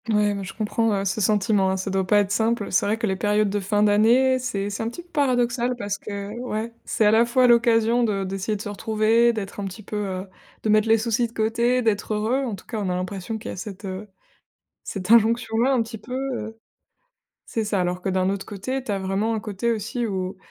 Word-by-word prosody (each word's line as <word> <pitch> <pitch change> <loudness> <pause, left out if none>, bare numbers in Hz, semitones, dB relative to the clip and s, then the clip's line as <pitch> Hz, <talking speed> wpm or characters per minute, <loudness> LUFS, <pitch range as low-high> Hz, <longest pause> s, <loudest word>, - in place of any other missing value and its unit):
Ouais 210 -1 +3
mais 200 -1 -4
je 190 - -8
comprends, 225 +1 0
heu, 195 0 -1
ce 195 +3 -1
sentiment 200 -1 +2
hein, 190 - 0
ça 190 +1 -3
doit 190 -1 0
pas 210 - +4
être 200 -1 -3
simple. 220 0 0
C'est 185 - +2
vrai 215 +2 +1
que 230 - -1
les 190 -3 0
périodes 210 +1 +1
de 205 - 0
fin 205 +2 +1
d'année 235 +6 +4
c'est 205 -6 -3
c'est 200 - -4
un 225 - -1
petit 345 +9 -9
peu 350 - -29
paradoxal, 250 -4 +1
parce 205 -4 -4
que 200 0 -6
ouais, 230 -2 -4
c'est 220 - +1
à 210 - +6
la 225 +1 +5
fois 250 +2 +3
l'occasion 235 0 +4
de 205 -4 0
d'essayer 195 +2 -2
de 205 - -6
se - - -5
retrouver, 220 +2 +2
d'être 210 -3 -6
un 200 - -3
petit 195 +3 -7
peu, 210 - -5
heu 190 -2 -3 0.4
de 220 - 0
mettre 215 +1 +4
les 225 0 +5
soucis 230 +1 0
de 230 - -20
côté, 235 +3 +1
d'être 215 -1 0
heureux. 220 +5 0
En 225 -5 -3
tout 190 - -15
cas 225 - -4
on 200 -3 -2
a 180 - 0
l'impression 185 +3 -4
qu'il 220 - -8
y - - -4
a - - -7
cette, 200 +2 -7
heu, 190 +2 -6 0.8
cette 195 +2 -2
injonction 225 0 +4
là 255 +4 +3
un 250 -3 +3
petit 225 0 -8
peu, 245 +4 -11 0.2
heu 225 -1 -6 0.9
c'est 225 - -2
ça, 205 -2 0
alors 180 0 -1
que - - -2
d'un 185 0 +1
autre 195 0 -2
côté 255 +6 -4
tu 215 - -2
as 200 - 0
vraiment 195 +4 -1
un 220 - -2
côté 210 +2 -2
aussi 230 +2 -2
où, 190 -2 -3
215 Hz, 250 wpm, -24 LUFS, 200-230 Hz, 0.9 s, à